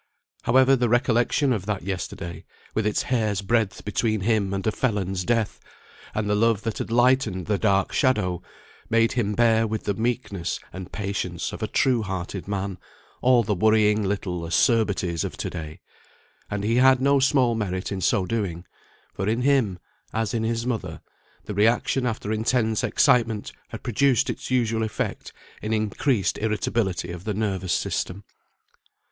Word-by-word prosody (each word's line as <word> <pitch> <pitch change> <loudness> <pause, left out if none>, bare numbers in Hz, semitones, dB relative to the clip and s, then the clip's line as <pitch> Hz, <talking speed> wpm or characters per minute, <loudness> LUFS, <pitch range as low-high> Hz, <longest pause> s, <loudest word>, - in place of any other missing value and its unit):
However, 130 +2 +5
the 120 -2 +1
recollection 120 +3 +2
of 100 -4 -4
that 100 -4 -2
yesterday, 90 -2 -5 0.3
with 110 -1 0
its 105 - 0
hair's 110 -5 0
breadth 110 -1 0
between 110 0 0
him 105 -1 +1
and 95 -1 -3
a 110 - +2
felon's 95 -6 -1
death, 115 0 0 0.6
and 105 -1 -1
the 105 - +1
love 110 0 +2
that 115 -2 -3
had - - -4
lightened 120 -5 +2
the 105 -2 0
dark 100 -3 +2
shadow, 105 - +1 0.5
made 115 0 +3
him 105 -5 0
bear 115 -1 +3
with 110 0 -3
the 100 - 0
meekness 110 -5 -2
and 95 -1 -8
patience 95 -4 -3
of - - -7
a - - -1
true 125 -3 +2
hearted 95 -1 -5
man 100 -2 -3 0.4
all 125 -2 +5
the 105 - 0
worrying 110 +1 +3
little 95 -3 -2
acerbities 95 -3 +1
of - - -5
to - - -4
day; 80 -3 -7 0.7
and 100 -1 -3
he 115 +3 +1
had 130 0 +6
no 140 +1 +3
small 130 -3 +3
merit 95 -4 -3
in 95 -1 -3
so 95 0 +2
doing; 90 -4 -3 0.5
for 95 - -3
in 115 +3 0
him, 130 -9 +2 0.4
as 110 +1 -1
in 115 - 0
his 115 +1 -1
mother, 120 -4 -3 0.5
the 105 - -5
re 105 +2 +4
action 125 +2 +1
after 110 -2 -3
intense 110 0 +1
excitement 115 -4 +2 0.2
had - - -9
produced 130 +2 +2
its - - -7
usual 115 -3 +1
effect 110 -1 -3 0.3
in 110 - -3
increased 110 0 0
irritability 105 -4 -1
of 85 0 -7
the 105 -1 -2
nervous 95 -4 -1
system. 95 +3 -2
110 Hz, 165 wpm, -24 LUFS, 95-115 Hz, 0.7 s, had